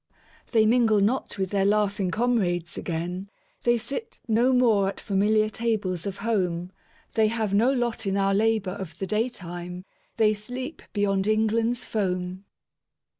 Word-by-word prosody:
They 220 -2 +4
mingle 225 -2 +4
not 215 +3 0
with 190 -2 -2
their 200 -1 +2
laughing 200 -2 +1
comrades 180 -5 0
again; 180 +3 -4 0.3
They 240 0 +3
sit 275 - -6
no 235 +3 +3
more 225 -6 +4
at - - -7
familiar 215 +2 +2
tables 210 -6 -2
of 195 -1 -4
home; 180 -5 0 0.4
They 220 -1 +4
have 220 -2 -1
no 230 +6 +4
lot 240 -5 -1
in 195 0 +1
our 195 0 +2
labour 215 -2 +2
of 180 -4 -7
the 195 - -3
day 215 +6 0
time; 180 -3 -8 0.3
They 215 -1 +4
sleep 250 +8 -6
beyond 195 -1 +1
England's 225 +2 +1
foam. 185 -2 -2
210 Hz, 150 wpm, -26 LUFS, 190-225 Hz, 0.4 s, They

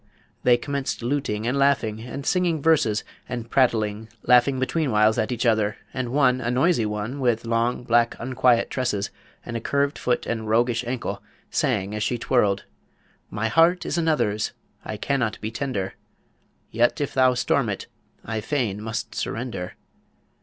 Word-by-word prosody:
they 125 -1 +5
commenced 140 +1 -3
luting 120 -5 -1
and 130 +4 0
laughing, 125 -6 +2
and 130 +4 -7
singing 175 -3 +1
verses, 140 -9 +2 0.3
and 120 -2 -5
prattling, 110 -4 +1
laughing 125 +2 +4
betweenwhiles 120 -7 +2
at 110 - -2
each 120 0 -1
other; 110 -2 +2 0.2
and 130 -2 -2
one, 130 -1 +3
a 120 - -1
noisy 125 -2 +2
one, 105 +6 -4
with 120 -3 +1
long, 115 +2 0
black, 120 0 +3
unquiet 125 -1 +2
tresses, 120 -6 -1 0.3
and 120 - -5
a 115 - -2
curved 140 +3 0
foot 125 - 0
and 110 -2 -3
roguish 120 +1 +2
ankle, 115 -5 -3 0.3
sang 105 - 0
as 105 - -3
she 120 - 0
twirled: 105 -5 +1 0.7
My 110 +1 -1
heart 165 +8 +4
is - - -2
another's, 155 -11 +1 0.3
I - - -5
cannot 120 -6 -1
be 110 - -4
tender; 110 -7 -3 0.8
Yet 120 +7 +2
if 145 - -2
thou 130 -1 +4
storm - - +1
it, - - -4 0.4
I 110 0 -3
fain 115 -6 -1
must 110 0 -4
surrender. 115 -7 -4
120 Hz, 155 wpm, -24 LUFS, 110-135 Hz, 0.8 s, they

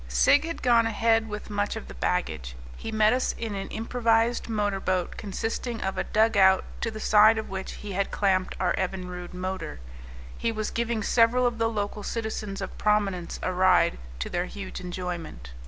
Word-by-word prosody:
Sigg - - +4
had 330 0 -5
gone 235 -2 +5
ahead 225 0 +2
with 210 0 -6
much 205 +1 -1
of 220 - -7
the - - -9
baggage; 75 - -2 0.2
he 225 - -6
met 215 0 +4
us 255 - 0
in 225 -2 -4
an 195 -1 -4
improvised 230 +1 +1
motor 205 -3 0
boat, 185 -2 -1
consisting 225 +3 -3
of 190 - -2
a - - -1
dugout 200 -3 +4 0.2
to 230 - 0
the 215 -1 -7
side 215 +1 +6
of 220 -3 -4
which 190 0 -5
he 210 - -8
had 195 +1 -1
clamped 190 -2 +1
our 185 - +2
Evinrude 180 -1 -4
motor; 185 - -4 0.6
he 230 - -1
was 215 -1 -3
giving 235 -2 -1
several 240 +3 +4
of 240 -2 0
the 225 0 +2
local 210 -1 -3
citizens 215 -2 -4
of - - -5
prominence 200 -5 0
a 185 - 0
ride, 185 - +4 0.2
to 65 - -3
their 175 +1 -1
huge 200 -2 -7
enjoyment. 175 - -6
210 Hz, 185 wpm, -27 LUFS, 185-225 Hz, 0.6 s, side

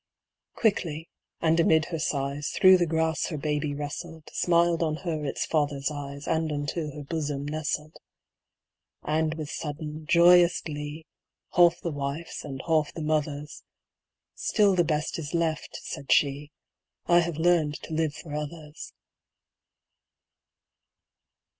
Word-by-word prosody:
Quickly, 165 -7 0 0.3
and 165 0 +3
amid 160 -1 +4
her 165 - -1
sighs, 140 -1 -1
Through 185 0 +6
the 175 - +2
grass 160 0 0
her 155 - -4
baby 150 0 -1
wrestled, 155 +2 -6
Smiled 170 -1 +3
on 155 -2 +1
her 160 -3 -2
its 140 - -2
father's 145 -2 0
eyes, 140 -1 -7
And 160 -1 0
unto 150 +1 -3
her 150 - -6
bosom 145 -2 -3
nestled. 155 0 -3 1.1
And 155 +1 0
with 155 -2 -5
sudden, 150 0 -5
joyous 175 +1 +6
glee, 150 +1 -6 0.5
Half 175 -1 +5
the 170 - -2
wife's 145 +3 -4
and 135 -3 -6
half 155 -3 +2
the 160 - -6
mother's, 150 -1 -2 0.7
"Still 205 -3 +2
the 180 -2 +3
best 155 0 -1
is 155 +1 -4
left," 165 -2 -1
said 140 - -5
she: 145 0 +2 0.6
"I 175 0 +5
have 170 -2 -1
learned 160 -3 +2
to 160 - -7
live 155 -2 0
for 155 -4 -9
others." 150 0 -6
155 Hz, 135 wpm, -27 LUFS, 145-165 Hz, 1.1 s, Through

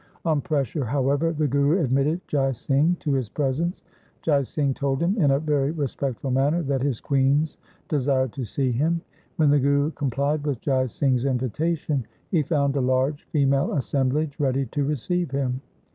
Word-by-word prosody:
On 155 -3 +2
pressure, 145 -3 -1
however, 140 +5 +1
the 155 -2 0
Guru 140 +6 +2
admitted 140 +6 +1
Jai 135 -2 +1
Singh 145 +8 +1
to 145 - 0
his 130 -5 -1
presence. 150 +7 -1 0.4
Jai 145 -3 +3
Singh 140 +1 -1
told 135 -1 -1
him 175 +4 +1
in 145 - +4
a 135 0 +3
very 145 -3 +1
respectful 140 -4 -3
manner 145 +6 +2
that 135 -2 -1
his 135 -4 -1
queens 140 +3 +1 0.3
desired 130 -4 +1
to 135 - -4
see 130 +3 -1
him. 160 +7 +1 0.3
When 150 -3 +3
the 145 - +4
Guru 140 +2 +2
com 145 -3 -2
plied 140 +4 0
with 145 -5 -2
Jai 130 -2 +1
Singh's 130 +1 0
invitation, 135 +1 -1 0.2
he 170 - +3
found 140 -2 0
a - - +2
large 130 +3 0
female 140 -2 +1
assemblage 140 +1 0
ready 135 -1 +1
to 145 - 0
receive 150 +4 -1
him. 130 -1 -2
140 Hz, 175 wpm, -24 LUFS, 135-150 Hz, 0.4 s, in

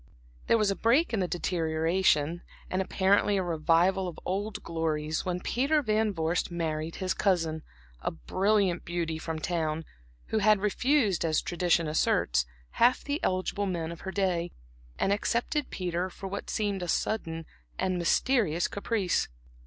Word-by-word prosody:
There 230 - +5
was 210 -2 +2
a - - -1
break 245 - +3
in 220 - +1
the 185 - +1
deterioration, 165 -1 +1 0.3
and 185 - +1
apparently 195 +2 +2
a 190 - +1
revival 175 +3 +2
of 175 - -7
old 200 +2 -3
glories, 160 -1 -2
when 180 -1 -1
Peter 290 +4 +1
Van 215 -2 +2
Vorst 165 -1 -1
married 165 -2 -3
his 185 -1 -1
cousin, 165 -5 +1 0.4
a - - 0
brilliant 190 - +1
beauty 170 -2 -2
from 160 0 -4
town, 160 -1 -2 0.4
who 220 - +1
had 215 0 +5
refused, 210 - +2
as 160 -2 +2
tradition 175 -2 +1
asserts, 60 - +2 0.2
half 245 +2 +3
the 285 +2 -2
eligible 185 +2 0
men 170 -3 -2
of 170 - -9
her 190 - -5
day, 180 -3 0 0.5
and 195 - +2
accepted 240 +7 -1
Peter 180 0 -2
for 195 - -10
what 200 +1 -5
seemed 205 -3 -1
a 175 - -3
sudden 165 -4 -1 0.3
and 185 -1 0
mysterious 175 - +2
caprice. 200 -3 0
185 Hz, 155 wpm, -29 LUFS, 165-205 Hz, 0.5 s, There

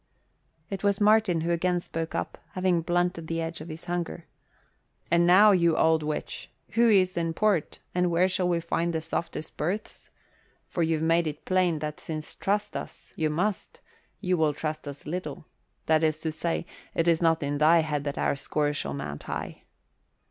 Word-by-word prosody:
It 195 - -4
was 200 -1 +2
Martin 210 -5 +4
who 170 +2 0
again 175 +1 +1
spoke 165 -1 -5
up, - - -3
having 185 -2 +1
blunted 175 0 0
the 165 0 -2
edge 165 -1 -4
of 155 - -8
his 160 +1 -8
hunger. 175 -1 -3 0.9
"And 170 0 +4
now, 200 +4 +8
you 170 -4 +3
old 160 -1 +4
witch, 150 0 -4 0.2
who's 205 -6 +4
in 165 -1 -1
port 205 -6 +1 0.2
and 180 0 +2
where 175 +2 +3
shall 185 -1 0
we 170 -1 +1
find 170 +1 -1
the 160 - -1
softest 160 -1 -4
berths? 185 +8 -4 0.6
For 175 - -3
you've 160 -1 +1
made 165 0 +3
it 150 0 -6
plain 185 -3 +2
that 150 0 -5
since 155 -1 -6
trust 205 +1 -1
us - - -7
you 155 -1 0
must, 180 +6 -2 0.4
you 180 0 0
will 155 -2 +2
trust 155 0 -4
us 140 0 -8
little 155 -2 -5 0.4
that 160 0 +3
is 155 -1 +1
to 160 - -1
say, 165 +2 -2 0.3
it 165 - +1
is 165 -1 +3
not 165 -2 +3
in 145 0 -1
thy 165 +2 +6
head 150 -2 -2
that 140 - -3
our - - +1
score 145 +1 -1
shall 70 - -3
mount 70 +1 -5
high." - - -6
165 Hz, 185 wpm, -27 LUFS, 155-180 Hz, 0.9 s, now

